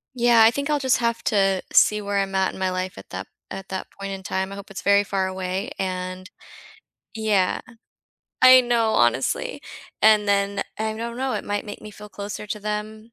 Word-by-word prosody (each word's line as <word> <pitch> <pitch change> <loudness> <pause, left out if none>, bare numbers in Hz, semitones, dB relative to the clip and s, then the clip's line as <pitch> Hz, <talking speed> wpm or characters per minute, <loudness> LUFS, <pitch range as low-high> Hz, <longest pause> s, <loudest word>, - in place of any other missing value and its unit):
Yeah, 240 -2 +5
I 220 - +7
think 280 +4 -3
I'll 300 - +2
just 260 -2 +2
have 235 -1 -1
to 195 -3 +2
see 210 - +5
where 200 0 -1
I'm 195 0 -2
at 190 0 +1
in - - -10
my 190 0 0
life 185 +2 -4
at - - -12
that - - -6 0.2
at 195 0 -7
that 190 -1 -4
point 195 0 -5
in 195 -1 -6
time. 190 +1 -2
I - - -6
hope 200 -1 -10
it's 195 -1 -7
very 200 0 +4
far 195 -1 -1
away 185 0 -4
and 185 0 -4 0.9
Yeah. 210 -4 +1 0.8
I 255 0 +9
know, 235 -3 +1
honestly, 120 +2 +1 0.4
and 215 -1 +5
then, 200 0 +1 0.2
I 220 0 -1
don't 235 +1 -5
know, 260 +1 -1
it - - -2
might 205 0 -2
make 205 -1 -8
me 215 - -10
feel 210 0 -12
closer 205 +1 -6
to 210 +1 -5
them 215 +2 -5
205 Hz, 205 wpm, -23 LUFS, 190-220 Hz, 0.9 s, I